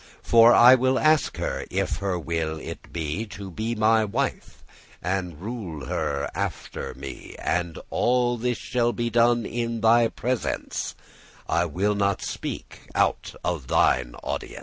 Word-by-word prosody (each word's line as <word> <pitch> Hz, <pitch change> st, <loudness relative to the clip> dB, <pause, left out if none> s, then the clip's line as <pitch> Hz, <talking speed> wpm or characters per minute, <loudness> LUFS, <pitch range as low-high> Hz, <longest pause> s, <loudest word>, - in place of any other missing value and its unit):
*conference -, -, -23 dB
For 115 Hz, +1 st, +8 dB
I 125 Hz, +2 st, +9 dB
will 130 Hz, +1 st, +3 dB
ask 155 Hz, +1 st, +3 dB
her, -, -, -2 dB
if -, -, -1 dB
her 100 Hz, -2 st, -1 dB
will 80 Hz, -1 st, -2 dB
it -, -, -9 dB
be 85 Hz, +7 st, -3 dB
To 100 Hz, -1 st, -8 dB
be 110 Hz, +6 st, -3 dB
my 110 Hz, +1 st, +4 dB
wife, 125 Hz, +6 st, -3 dB, 0.4 s
and 90 Hz, -3 st, -3 dB
rule 95 Hz, -, -6 dB
her 70 Hz, +3 st, -1 dB
after -, -, -4 dB
me: 65 Hz, -1 st, -9 dB
And 85 Hz, -1 st, -1 dB
all 120 Hz, 0 st, +2 dB
this 125 Hz, +1 st, -1 dB
shall 120 Hz, -1 st, 0 dB
be 120 Hz, -1 st, -2 dB
done 120 Hz, 0 st, +3 dB
in 115 Hz, -1 st, -2 dB
thy 115 Hz, +1 st, +5 dB
presence, 125 Hz, +1 st, -3 dB, 0.5 s
I 85 Hz, -, +2 dB
will 95 Hz, +6 st, 0 dB
not 100 Hz, -1 st, 0 dB
speak -, -, -6 dB
out -, -, +1 dB
of 85 Hz, -8 st, -2 dB
thine -, -, +2 dB
audience." -, -, -4 dB
110 Hz, 150 wpm, -25 LUFS, 85-120 Hz, 0.5 s, I